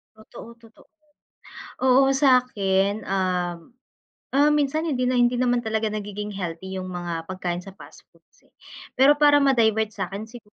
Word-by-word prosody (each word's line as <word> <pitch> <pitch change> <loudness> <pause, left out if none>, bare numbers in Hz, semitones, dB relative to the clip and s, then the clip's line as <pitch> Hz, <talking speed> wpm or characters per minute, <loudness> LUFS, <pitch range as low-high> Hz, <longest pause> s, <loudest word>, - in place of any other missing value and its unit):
Totoo, 220 +1 -13
totoo, 225 -1 -21 1.0
oo, 260 +1 +5
sa 265 -2 +5
akin, 200 -3 -1
um, 180 -2 -1 0.8
um, 290 +2 +4
minsan 300 +2 0
hindi 260 -6 -1
na, 255 - 0
hindi 245 0 +3
naman 245 -1 +1
talaga 220 0 -1
nagiging 210 0 -5
healthy 190 0 -6
yung 185 0 -6
mga 175 -2 -5
pagkain 180 -2 -4
sa 195 - -11
fast - - -16
foods, - - -30
eh, - - -38 0.4
pero 280 +3 +5
para 290 -1 +5
ma-divert 220 -5 +2
sa 195 -3 -4
akin 200 +2 -6
siguro 240 +1 -12
220 Hz, 160 wpm, -23 LUFS, 190-255 Hz, 1.0 s, oo